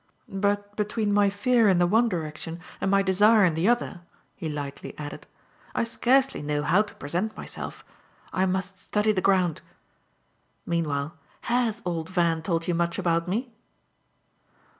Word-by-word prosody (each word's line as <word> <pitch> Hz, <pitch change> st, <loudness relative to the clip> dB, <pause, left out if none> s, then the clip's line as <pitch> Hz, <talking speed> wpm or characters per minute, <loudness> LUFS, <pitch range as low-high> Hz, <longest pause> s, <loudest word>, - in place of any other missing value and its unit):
But 205 Hz, +1 st, -1 dB
between 210 Hz, 0 st, 0 dB
my 205 Hz, -1 st, +4 dB
fear 225 Hz, +2 st, +3 dB
in 185 Hz, -, +4 dB
the 175 Hz, -, +4 dB
one 225 Hz, +6 st, +3 dB
direction 165 Hz, -1 st, -4 dB, 0.2 s
and -, -, +1 dB
my 195 Hz, 0 st, +4 dB
desire 205 Hz, +2 st, +5 dB
in 170 Hz, -, +2 dB
the 165 Hz, +5 st, +1 dB
other," 240 Hz, -6 st, +1 dB, 0.3 s
he 165 Hz, -5 st, -4 dB
lightly 145 Hz, -2 st, -6 dB
added, 145 Hz, -1 st, -7 dB, 0.5 s
"I -, -, +2 dB
scarcely 260 Hz, +3 st, +2 dB
know 150 Hz, 0 st, -1 dB
how 175 Hz, +7 st, +4 dB
to 215 Hz, -, -6 dB
present 175 Hz, +9 st, -3 dB
myself. -, -, -7 dB, 0.5 s
I 190 Hz, 0 st, +2 dB
must 190 Hz, +1 st, -2 dB
study 210 Hz, +2 st, +1 dB
the 190 Hz, -3 st, 0 dB
ground. 180 Hz, -5 st, +2 dB, 1.0 s
Meanwhile 155 Hz, -3 st, -1 dB, 0.3 s
HAS 240 Hz, -2 st, 0 dB
old 165 Hz, -2 st, -2 dB
Van 170 Hz, -3 st, +1 dB
told 165 Hz, 0 st, -1 dB
you 175 Hz, -, +1 dB
much 170 Hz, 0 st, 0 dB
about 170 Hz, -3 st, +1 dB
me?" 230 Hz, +6 st, -2 dB
190 Hz, 155 wpm, -26 LUFS, 165-210 Hz, 1.0 s, desire